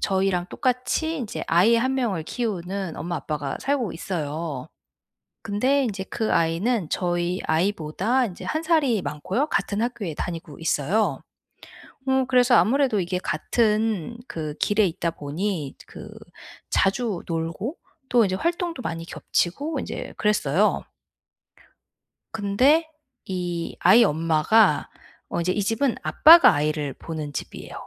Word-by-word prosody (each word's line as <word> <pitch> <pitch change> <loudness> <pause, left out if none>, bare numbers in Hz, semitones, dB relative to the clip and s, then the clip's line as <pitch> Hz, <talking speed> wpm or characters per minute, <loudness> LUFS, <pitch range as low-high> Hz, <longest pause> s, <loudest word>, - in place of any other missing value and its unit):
저희랑 190 -2 +1
똑같이 255 +6 -1
인제 240 -6 -5
아이 185 +8 +4
1 260 +3 +1
명을 215 -11 -1
키우는 195 -5 -3
엄마, 175 +1 -3
아빠가 150 -3 -4
살고 270 -8 -1
있어요. 155 -4 -4 0.7
근데 255 +7 +1
인제 195 -5 -3
그 220 -2 -1
아이는 170 +4 +1
저희 175 0 -1
아이보다 190 +8 +1
인제 180 - -9
1 315 +1 -2
살이 305 - +2
많고요 190 - -2
같은 205 -7 -1
학교에 220 -9 -3
다니고 165 -2 -6
있어요. 165 +1 0 0.9
어 265 0 +2
그래서 250 -1 +5
아무래도 255 -2 +3
이게 180 +1 -2
같은 215 +4 0
그 155 -2 -5
길에 205 0 +3
있다 170 0 -2
보니 155 0 -4
그 - - -10 0.6
자주 200 -1 +1
놀고 165 - -3 0.3
또 240 -2 +5
이제 185 -1 -1
활동도 340 - -2
많이 165 -7 -4
겹치고 280 - -2
인제 - - -6
그랬어요. 210 -2 +1 1.5
근데 255 +10 +2 0.4
이 175 -2 -4
아이 210 +7 +7
엄마가 165 +5 +3 0.4
어 - - -2
이제 180 +2 0
이 205 - 0
집은 230 +5 +1
아빠가 310 - +8
아이를 150 -2 -1
보는 155 -3 -6
집이에요. - - -7
195 Hz, 265 characters per minute, -24 LUFS, 165-245 Hz, 1.5 s, 아빠가